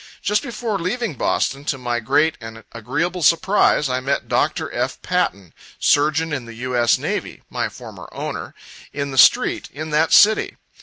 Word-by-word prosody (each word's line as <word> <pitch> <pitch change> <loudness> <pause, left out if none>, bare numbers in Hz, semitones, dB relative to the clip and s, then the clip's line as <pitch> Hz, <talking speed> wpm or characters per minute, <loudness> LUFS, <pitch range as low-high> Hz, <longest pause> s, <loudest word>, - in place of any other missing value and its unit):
Just 210 +1 +1
before 230 -5 -3
leaving 205 +4 -2
Boston, 135 +1 -1
to 140 - -1
my 120 -2 -2
great 145 +7 +2
and 115 0 -9
agreeable 150 +11 -3
surprise, 165 -1 +3
I 130 0 -1
met 135 +2 -2
Dr. - - -1
F. - - -2
Patten, 95 -2 -1 0.2
surgeon 155 +2 +2
in 130 -5 -3
the 115 -1 -10
U. 125 +2 -4
S. 120 -1 +3
Navy, - - -4
(my - - -2
former - - -11
owner,) - - -6 0.4
in 140 -1 -4
the 135 - -6
street, - - +4
in 155 +2 -7
that 155 +2 +2
city. 215 +1 +5
145 Hz, 165 wpm, -20 LUFS, 125-170 Hz, 0.4 s, city